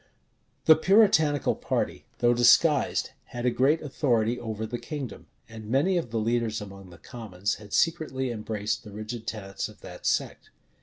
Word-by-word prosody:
The 160 - +8
Puritanical 160 - +4
party, - - -2
though 120 0 +3
disguised, 130 +5 +4
had 120 0 -6
a 125 - +3
great 140 +7 +2
authority 120 -5 0
over 110 -1 -4
the 120 +2 -5
kingdom; 140 -9 -7 0.2
and 110 -2 -10
many 145 +10 +2
of 170 -9 -1
the 115 - -3
leaders 115 0 0
among 100 -2 -10
the 85 - -14
commons 100 +1 -4
had 105 -1 -13
secretly 130 -5 0
embraced 105 -1 -3
the 105 - -11
rigid 110 +2 -7
tenets 95 -3 -4
of - - -17
that - - -7
sect. - - -1
120 Hz, 160 wpm, -27 LUFS, 110-140 Hz, 0.2 s, The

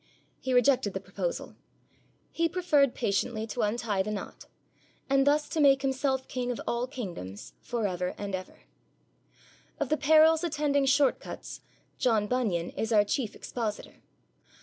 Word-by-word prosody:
He 260 - -3
rejected 245 -5 +3
the - - -1
proposal. - - -4 0.8
He 335 0 +1
preferred 305 -7 +2
patiently 220 +1 -1
to 230 +2 -4
untie 210 -2 0
the 200 - -3
knot, 210 -2 -6 0.6
and 275 0 +3
thus 295 +1 +3
to 325 - -2
make 275 -2 +5
Himself 265 0 0
king 250 -1 -3
of 245 - -3
all 235 +1 -1
kingdoms 175 - -7
for 235 -3 -2
ever 180 -1 -2
and 200 -1 -5
for 185 - 0
ever. 185 - -14 1.2
Of - - -1
the 310 - +2
perils 315 +2 +5
attending 290 -4 +1
short 280 0 +3
cuts - - -8 0.4
John 225 -4 +2
Bunyan 210 -8 -1
is 225 - -3
our 210 -2 +5
chief 220 +2 -2
expositor. 220 -4 -5
250 Hz, 150 wpm, -29 LUFS, 210-280 Hz, 1.2 s, make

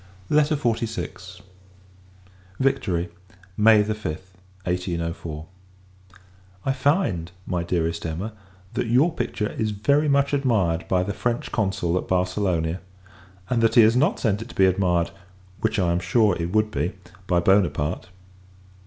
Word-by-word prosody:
LETTER 150 +1 +4
XLVI. 110 - -3 1.2
Victory, 90 -10 0 0.5
May 105 0 +6
5, 110 +1 -4 0.6
1804. 85 -3 -3 1.2
I 135 - +2
find, 130 - 0
my 90 -2 -1
Dearest 85 -1 -1
Emma, 90 +8 -4 0.4
that - - -1
your 135 +9 +3
picture 115 -6 -2
is 110 - -1
very 140 +9 +2
much 140 0 +2
admired 105 -12 +1
by 90 -1 +2
the 100 - -3
French 120 +3 -2
Consul 95 -4 0
at - - -7
Barcelona; 90 -2 0 0.7
and 120 -2 +1
that 115 0 +3
he 120 - +9
has 110 +1 +5
not 150 +10 +2
sent 105 -3 0
it 115 - -8
to - - -12
be 95 - +5
admired 90 -2 +2 0.5
which, 110 0 0
I 90 -4 +2
am 85 - +1
sure, 100 +2 +3
it 85 +1 -3
would 110 +1 +2
be 90 -2 -1 0.3
by 90 -2 +3
Buonaparte. 90 -3 +1
100 Hz, 135 wpm, -24 LUFS, 90-115 Hz, 1.2 s, he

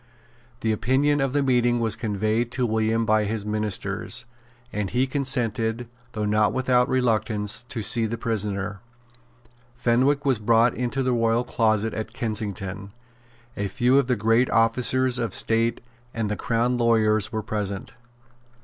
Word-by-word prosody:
The 110 - +1
opinion 135 +6 +1
of 135 -1 0
the 145 +1 +1
meeting 120 -2 +2
was 115 -2 -1
conveyed 110 +2 -1
to 125 -1 0
William 110 0 +1
by 110 -1 +2
his 105 0 -3
ministers; 105 -2 -3 0.5
and 105 -2 -2
he 125 +2 +1
consented, 120 -4 -1 0.3
though 105 -2 -2
not 105 0 +2
without 125 -1 +2
reluctance, 110 -4 0
to 115 - -3
see 115 +1 +2
the 115 +2 -4
prisoner. 105 -3 -3 1.0
Fenwick 130 +4 +2
was 130 -5 +2
brought 115 +2 +3
into 125 +2 -2
the 130 -1 +1
royal 115 0 +2
closet 110 -3 0
at 110 0 -5
Kensington. 100 -4 -4 0.6
A 100 - -2
few 125 +6 +3
of 135 - 0
the 125 - +2
great 115 +3 +2
officers 125 +2 +2
of 115 -1 -2
state 115 +1 +1 0.3
and 110 -2 -1
the - - 0
Crown 120 +3 0
lawyers 110 -2 +2
were 110 -2 -3
present. 100 -2 -4
115 Hz, 150 wpm, -24 LUFS, 110-125 Hz, 1.0 s, brought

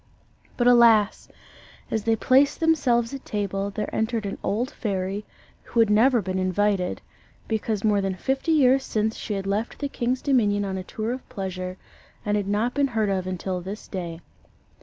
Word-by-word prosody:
But 240 - +1
alas! 230 -4 +5 0.6
as 220 -2 -1
they 225 -1 +3
placed 265 +6 +3
themselves 265 -8 +2
at 275 - -6
table, 200 -1 -2
there 210 +1 -4
entered 220 -1 -1
an 200 - -4
old 240 +6 -1
fairy 195 -1 -3 0.4
who 235 - -3
had 225 -2 +5
never 235 +2 +4
been 185 +1 -2
invited, 185 0 0 0.5
because 220 -2 -1
more 210 -2 +3
than 195 -1 -1
fifty 270 - -1
years 270 -3 +4
since 220 -1 -1
she 210 - -4
had 195 -1 -4
left 205 +4 -2
the 285 - -2
king's 250 -1 -2
dominion 210 -7 +2
on 190 -1 -3
a - - -5
tour 220 +4 -4
of 255 +1 -6
pleasure, 185 -5 -5 0.5
and 210 0 +1
had 205 -2 -1
not 215 +5 0
been 285 -1 +2
heard 220 -5 0
of 190 -2 -1
until 185 0 -3
this 195 +4 -7
day. 170 -3 -5
210 Hz, 180 wpm, -25 LUFS, 195-240 Hz, 0.6 s, alas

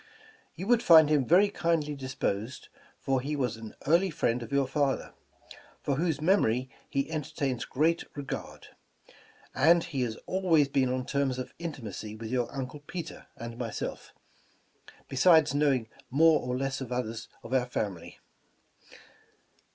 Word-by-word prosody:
You 185 - -5
would 235 +1 +4
find 160 -7 +7
him 145 -5 +2
very 190 +5 +5
kindly 165 -6 0
disposed, 130 -4 -3 0.3
for 135 -1 0
he 145 +3 -3
was 125 -6 -1
an 110 -1 -10
early 170 +6 +4
friend 120 -6 0
of 115 - -8
your 140 -1 +2
father, 135 0 -1 0.7
for 140 -2 0
whose 160 -2 0
memory 130 - +2 0.2
he 140 +3 -1
entertains 140 -5 -2
great 165 +5 +1
regard; 145 -2 -6 0.8
and 165 +5 +5
he 140 -6 -3
has 115 -3 -1
always 175 -6 +3
been 130 -2 +1
on 130 0 -2
terms 140 -2 0
of 130 - -6
intimacy 115 - -6
with 110 +1 -7
your 125 -2 0
uncle 135 +2 -5
Peter 165 +3 -8
and 115 0 -7
myself, 115 -3 -5 1.0
besides 155 +1 +5
knowing 140 -5 +2 0.2
more 160 +4 +5
or 125 0 -2
less 135 0 -2
of 125 -2 -6
others 115 -2 -3 0.2
of 115 - -7
our 125 -2 +2
family. 100 -8 -4
135 Hz, 145 wpm, -29 LUFS, 125-155 Hz, 1.0 s, find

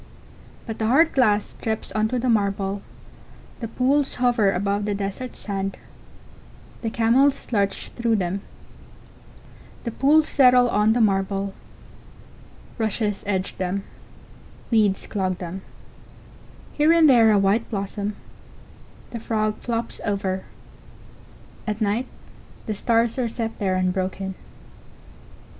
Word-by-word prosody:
But 225 -2 -6
the 220 - 0
hard 315 +8 +4
glass 210 -6 +2
drips 220 -1 -3
on 215 0 +1
to 250 +3 -2
the 250 +1 -1
marble; 200 -3 0 0.8
the 230 - -4
pools 265 +5 +1
hover 240 -5 +3
above 200 +2 -1
the 205 -1 -1
dessert 200 +6 -5
sand; 195 -1 -3 1.0
the 225 - -1
camels 245 +6 +2
lurch 200 -2 0
through 235 -1 +1
them; 190 0 -1 1.4
the 235 - -3
pools 300 +6 +4
settle 250 -2 +5
on 210 +2 +3
the 240 - +1
marble; 195 -1 +1 1.3
rushes 215 -2 -1
edge 190 -2 -2
them; 190 +2 -2 0.9
weeds 210 -4 +2
clog 185 -3 -2
them; 180 +1 -6 1.1
here 300 +2 +4
and 335 -2 +6
there 235 -5 +6
a 210 - +5
white 200 +4 +2
blossom; 200 0 -3 1.0
the 235 - -5
frog 215 -1 -1
flops 230 -1 -3
over; 195 -2 -2 1.2
at 215 0 -2
night 220 +4 0 0.6
the 215 - -2
stars 230 +3 +1
are 240 -2 0
set 225 0 -4
there 190 -3 0
unbroken. 185 +1 -1
215 Hz, 120 wpm, -23 LUFS, 195-235 Hz, 1.4 s, and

